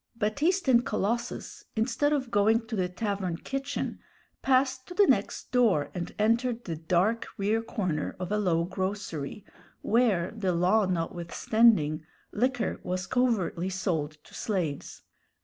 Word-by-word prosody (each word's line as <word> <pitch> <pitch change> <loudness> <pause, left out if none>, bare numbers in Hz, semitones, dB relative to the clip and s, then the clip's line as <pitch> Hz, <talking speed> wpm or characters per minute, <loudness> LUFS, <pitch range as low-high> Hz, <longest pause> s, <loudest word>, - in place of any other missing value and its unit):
Baptiste 290 - +1
and 240 -2 +5
Colossus, 235 +3 -3
instead 240 +6 +1
of 265 -5 -1
going 220 +3 +3
to 225 0 -4
the 185 -3 0
tavern 190 -2 -2
kitchen, 275 +7 -4 0.4
passed 260 0 +2
to 355 - -9
the 410 - +6
next - - 0
door 195 - +3
and 175 -1 -5
entered 230 +2 +1
the 165 - -3
dark 180 +8 +1
rear 210 +3 +1
corner 185 -9 -2
of 180 +1 -4
a 210 - +1
low 170 -5 +2
grocery, 185 -1 -4 0.4
where, 215 -7 +2
the 195 -5 0
law 185 +4 +3
notwithstanding, 170 0 +2 0.3
liquor 245 +1 0
was 185 +1 -3
covertly 195 -8 0
sold 170 -5 -1
to - - -18
slaves. 175 -9 -3
210 Hz, 135 wpm, -28 LUFS, 180-235 Hz, 0.4 s, the